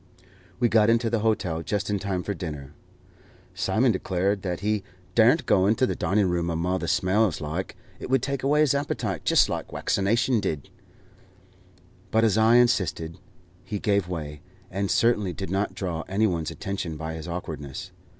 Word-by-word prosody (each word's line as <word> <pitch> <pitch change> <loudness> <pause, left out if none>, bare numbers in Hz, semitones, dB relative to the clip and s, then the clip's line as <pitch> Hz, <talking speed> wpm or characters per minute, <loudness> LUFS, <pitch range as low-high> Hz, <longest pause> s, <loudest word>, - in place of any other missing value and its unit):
We 120 - +4
got 110 -1 +4
into 115 0 +2
the 115 - +1
hotel 105 -7 0
just 100 +3 -2
in 100 - 0
time 95 -2 -2
for 100 - -2
dinner. 75 -6 -7 0.8
Simon 120 +2 +2
declared 95 +1 0
that 90 -2 -3
he 105 0 0 0.3
"dar'n't 120 - +4
go 95 0 +3
into 110 +5 +3
the - - -1
dining 100 +1 +1
room 85 -1 0
amo' 85 +3 0
the 85 - -4
swells 95 +1 +2
like; 80 +5 -4 0.2
it - - -7
would 130 -2 +2
take 140 -2 -2
away 145 +3 +3
his 150 -3 +4
appetite 125 - -2
jist - - +5
like - - -3
waccination 115 +5 +1
did;" 75 -7 -3 1.4
but 110 +1 +2
as 110 -3 +3
I 110 +2 +5
insisted, 95 -9 +2 0.4
he 105 +2 -4
gave 100 -2 +1
way, 75 -4 -5 0.3
and 100 +1 -2
certainly 105 -6 +2
did 95 -1 -6
not 100 +2 -1
draw 85 -4 -3
any 100 +3 +1
one's 85 -6 -1
attention 95 -5 -4
by 80 +1 -5
his 80 +1 -7
awkwardness. 85 -1 -6
100 Hz, 170 wpm, -25 LUFS, 85-110 Hz, 1.4 s, jist